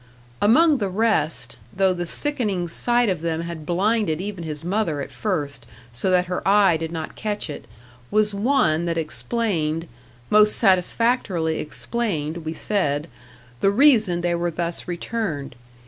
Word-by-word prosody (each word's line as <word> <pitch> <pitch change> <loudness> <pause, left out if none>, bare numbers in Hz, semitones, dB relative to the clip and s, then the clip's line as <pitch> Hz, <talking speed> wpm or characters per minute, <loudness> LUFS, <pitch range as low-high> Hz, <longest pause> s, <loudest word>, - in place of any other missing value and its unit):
Among 285 +8 +5
the 200 -3 -1
rest 190 -6 0
though 190 -1 +2
the 175 -1 -3
sickening 210 - 0
sight 240 +7 +1
of 185 -6 -1
them 165 -1 -1
had 170 -3 -7
blinded 190 -2 +1
even 190 -2 -5
his 155 0 -3
mother 180 -5 0
at 140 - -5
first, 145 - -3 0.3
so 120 +10 -1
that 180 -1 +3
her 180 0 -3
eye 195 -3 +5
did 160 0 -5
not 160 -2 -5
catch 210 -6 -3
it, - - -8 0.4
was 210 0 +2
one 200 - +2
that 170 -1 -1
explained 165 -1 -1 0.4
most 210 0 +5
satisfactorily 190 -4 +1
explained, 165 -3 -3
we 160 -1 -5
said 160 -5 -1 0.5
the 195 - +3
reason 215 -7 +4
they 175 0 0
were 170 0 0
thus 170 +1 -3
returned. 175 - -3
180 Hz, 145 wpm, -23 LUFS, 160-210 Hz, 0.5 s, Among